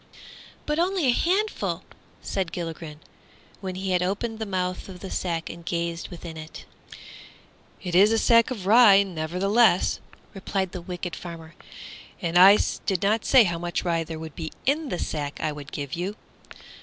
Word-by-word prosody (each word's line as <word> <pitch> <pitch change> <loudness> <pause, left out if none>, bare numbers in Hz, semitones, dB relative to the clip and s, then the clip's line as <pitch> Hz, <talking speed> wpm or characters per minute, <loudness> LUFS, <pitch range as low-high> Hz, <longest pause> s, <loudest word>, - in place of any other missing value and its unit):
"But 300 +1 -1
only 360 -2 +1
a 255 - +5
handful!" 390 - 0 0.4
said 190 -4 -2
Gilligren, 165 -3 -6 0.6
when 190 -1 -5
he 190 0 -3
had 180 -1 +2
opened 215 +5 -2
the 220 - -3
mouth 185 -1 -3
of 180 -1 -9
the 190 - -8
sack 170 -2 -2
and 170 0 -9
gazed 170 0 -3
within 170 -2 -9
it. 155 0 -10 1.2
"It 180 -2 -4
is 200 +5 +6
a 225 - +3
sack 230 0 +4
of 220 -8 -5
rye, 205 -2 +7
nevertheless," 185 +4 +2 0.3
replied 190 -1 -2
the 180 - -6
wicked 180 0 -5
farmer, 165 -2 -9 0.7
"and 170 -1 -3
I 190 +3 +9 0.3
did 195 -1 0
not 210 +2 +1
say 260 -3 +7
how 170 -4 -2
much 175 0 -2
rye 170 -2 0
there 160 0 -7
would 160 -1 -8
be 160 -1 -5
in 290 +2 +1
the 180 - -2
sack 145 -4 -4
I 155 - -1
would 145 -1 -9
give 140 -2 -5
you. 185 +4 -3
180 Hz, 170 wpm, -25 LUFS, 170-210 Hz, 1.2 s, I